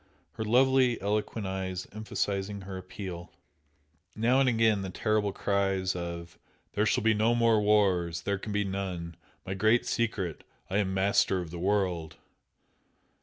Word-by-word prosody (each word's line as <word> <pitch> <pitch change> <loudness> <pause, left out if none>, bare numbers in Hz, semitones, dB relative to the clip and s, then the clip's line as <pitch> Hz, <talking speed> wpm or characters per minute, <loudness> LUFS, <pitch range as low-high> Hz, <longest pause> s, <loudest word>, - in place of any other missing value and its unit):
her 110 - -5
lovely, 125 +2 +3
eloquent 105 +1 -2
eyes 95 -1 -3
emphasising 100 -1 -3
her 95 0 -7
appeal. 95 -1 -7 0.8
Now 120 +4 +3
and 135 -2 +4
again 110 -3 +3
the 95 - -4
terrible 105 +1 0
cries 95 -2 0
of 85 -1 -6 0.3
"There 105 +1 +1
shall 120 +1 +1
be 110 0 +4
no 110 +3 +2
more 115 -2 +4
wars! 95 -5 +2
There 100 +1 -1
can 105 - -6
be 105 0 +1
none! 95 -4 -4 0.3
My 95 - -3
Great 110 +5 +3
Secret! 100 -8 -2 0.3
I 95 - +1
am 95 -2 0
Master 95 0 +2
of 85 -3 -6
the 85 - -6
World!" 90 -4 0
100 Hz, 150 wpm, -29 LUFS, 95-110 Hz, 0.8 s, and